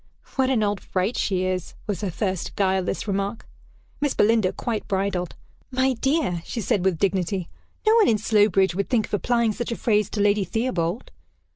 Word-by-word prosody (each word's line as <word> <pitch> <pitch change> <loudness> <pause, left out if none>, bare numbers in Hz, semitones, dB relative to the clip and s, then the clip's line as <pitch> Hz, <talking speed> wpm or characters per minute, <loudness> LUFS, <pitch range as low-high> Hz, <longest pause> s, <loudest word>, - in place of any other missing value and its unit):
"What 265 -1 +2
an 240 -5 +2
old 205 -1 0
fright 190 +5 -1
she 185 -2 0
is!" 185 -1 -3
was 205 -2 -3
her 200 - -1
first 185 0 -3
guileless 190 0 0
remark. 200 +2 -2 0.5
Miss 290 -2 0
Belinda 215 -3 +3
quite 230 -3 -3
bridled. 190 -3 -1 0.3
"My 260 +1 +2
dear," 265 - 0
she 235 - -5
said, 195 -3 0
with 190 -3 +2
dignity, 185 -1 0 0.4
"no 435 - +5
one 440 - +5
in 220 - +4
Slowbridge 205 -3 +3
would 200 +2 -2
think 235 -4 +2
of - - -19
applying 235 +2 +2
such 240 +2 -4
a - - -1
phrase 210 -3 +1
to 210 - -4
Lady 205 0 +3
Theobald." 220 -4 -2
205 Hz, 180 wpm, -24 LUFS, 190-230 Hz, 0.5 s, no